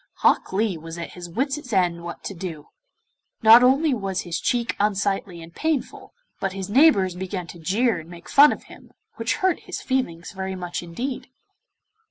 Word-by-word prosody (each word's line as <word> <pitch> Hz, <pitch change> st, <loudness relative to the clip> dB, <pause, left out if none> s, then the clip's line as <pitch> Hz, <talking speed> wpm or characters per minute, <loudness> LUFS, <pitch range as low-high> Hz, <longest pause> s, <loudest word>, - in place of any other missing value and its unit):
Hok -, -, +3 dB
Lee 195 Hz, -3 st, 0 dB
was 165 Hz, +1 st, -8 dB
at 170 Hz, -, -6 dB
his 175 Hz, -1 st, -9 dB
wits' 270 Hz, -, -2 dB
ends 180 Hz, -4 st, +2 dB
what 170 Hz, 0 st, -8 dB
to -, -, -5 dB
do. 165 Hz, -5 st, -7 dB, 0.7 s
Not 225 Hz, +2 st, +9 dB
only 270 Hz, +4 st, +4 dB
was 195 Hz, -5 st, -2 dB
his 175 Hz, -1 st, -3 dB
cheek 240 Hz, -1 st, 0 dB
unsightly 200 Hz, -4 st, -1 dB
and 165 Hz, +1 st, -13 dB
painful, 315 Hz, -, -3 dB, 0.2 s
but 195 Hz, -1 st, -2 dB
his 195 Hz, 0 st, -5 dB
neighbours 225 Hz, -, +5 dB
began 185 Hz, 0 st, -5 dB
to 170 Hz, -, -10 dB
jeer 200 Hz, +4 st, +1 dB
and 160 Hz, +1 st, -12 dB
make 175 Hz, 0 st, -12 dB
fun 290 Hz, +1 st, +7 dB
of -, -, -5 dB
him, -, -, -16 dB, 0.2 s
which -, -, 0 dB
hurt 375 Hz, -2 st, +1 dB
his -, -, -6 dB
feelings 180 Hz, -11 st, -2 dB
very 190 Hz, -1 st, -4 dB
much 175 Hz, -1 st, -4 dB
indeed. 240 Hz, +10 st, -5 dB
190 Hz, 180 wpm, -23 LUFS, 175-245 Hz, 0.7 s, Not